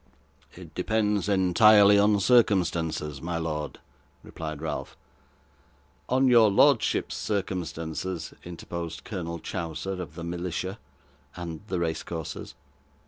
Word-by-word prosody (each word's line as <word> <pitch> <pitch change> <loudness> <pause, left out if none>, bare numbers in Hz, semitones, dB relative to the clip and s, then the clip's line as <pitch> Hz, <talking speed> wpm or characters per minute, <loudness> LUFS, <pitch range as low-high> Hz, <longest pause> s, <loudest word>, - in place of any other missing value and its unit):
'It - - -12
depends 105 -2 0
entirely 100 +2 +6
on 105 0 +4
circumstances, 85 - +2
my 85 0 -3
lord,' 75 -2 -4 0.4
replied 75 -2 -6
Ralph. 80 0 -5 1.1
'On 130 +1 +3
your 115 -4 +6
lordship's 100 - +3
circumstances,' 90 -3 -3
interposed 85 -1 -6
Colonel 85 -5 -5
Chowser 90 +3 -4
of 80 -3 -8
the 85 - -7
Militia 90 +3 -4 0.6
and 85 -2 -6
the 95 - -2
race 80 -2 -1
courses. 80 -3 -6
90 Hz, 105 wpm, -27 LUFS, 80-100 Hz, 1.1 s, entirely